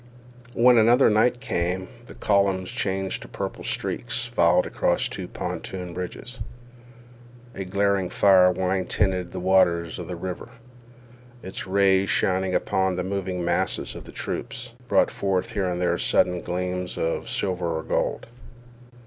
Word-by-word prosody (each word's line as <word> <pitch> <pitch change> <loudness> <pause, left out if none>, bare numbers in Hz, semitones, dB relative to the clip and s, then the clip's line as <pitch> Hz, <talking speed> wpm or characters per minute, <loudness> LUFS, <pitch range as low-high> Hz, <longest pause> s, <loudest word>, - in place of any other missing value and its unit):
When 120 0 +6
another 120 +3 +5
night 120 +3 +3
came, 90 -2 -2 0.2
the - - -11
columns, 100 -2 +1
changed 95 -1 -2
to - - -9
purple - - -5
streaks, 120 0 -2
filed 85 -9 +3
across - - 0
two - - -6
pontoon 90 -2 -5
bridges. 90 +8 -6 1.1
A 95 - -5
glaring 100 -1 +1
fire 95 -2 +5
wine 95 +1 -1
tinted 95 -3 0
the 95 - -5
waters 85 -3 +2
of - - -6
the 90 - -4
river. 90 +5 -6 0.9
Its 95 +1 -6
rays, 95 0 +3
shining 95 0 +1
upon 95 -1 +1
the 90 - -2
moving 95 -2 -3
masses 85 0 0
of - - -10
troops, - - -5
brought - - +3
forth 95 -2 -1
here 95 -3 -1
and 90 0 -2
there 90 -1 +1
sudden 90 -1 +2
gleams 90 +1 -3
of 80 - -2
silver 90 -4 -1
or - - -4
gold. - - -1
95 Hz, 140 wpm, -25 LUFS, 90-100 Hz, 1.1 s, When